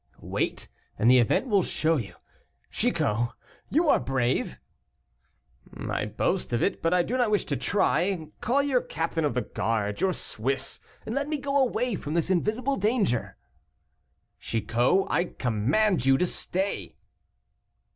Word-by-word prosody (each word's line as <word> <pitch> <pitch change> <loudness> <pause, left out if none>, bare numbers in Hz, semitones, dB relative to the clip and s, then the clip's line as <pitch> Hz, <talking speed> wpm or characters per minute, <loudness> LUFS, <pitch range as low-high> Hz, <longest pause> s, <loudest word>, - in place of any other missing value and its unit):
"Wait, - - -3 0.3
and 115 +3 +4
the 130 - +7
event 120 - +2
will 205 -6 +3
show 165 -1 +1
you. 100 -9 -5 0.6
Chicot, 115 +3 0 0.4
you 320 +4 +2
are - - +5
brave!" 130 -2 -1 1.2
"I - - -2
boast 120 - -1
of 120 - +1
it, - - 0
but 165 - +1
I 180 -1 +4
do 250 +8 -2
not 245 -3 +2
wish 210 -1 +1
to - - -1
try. 180 -4 0
Call 270 +5 +2
your 265 -3 +2
captain 165 0 -2
of 145 - -1
the 125 - 0
guard, 105 -2 -2
your 190 -1 +2
Swiss, 135 +1 -2 0.3
and 220 - -4
let 280 +2 -1
me 305 - 0
go 280 0 -3
away 250 -3 +2
from 150 -5 -4
this 170 +2 +1
invisible 220 +9 0
danger." 205 - 0 1.0
"Chicot, 120 - +1
I 175 - +1
command 140 - +1
you 135 0 +6
to 180 - +2
stay." 190 +2 -3
175 Hz, 150 wpm, -27 LUFS, -, 1.2 s, the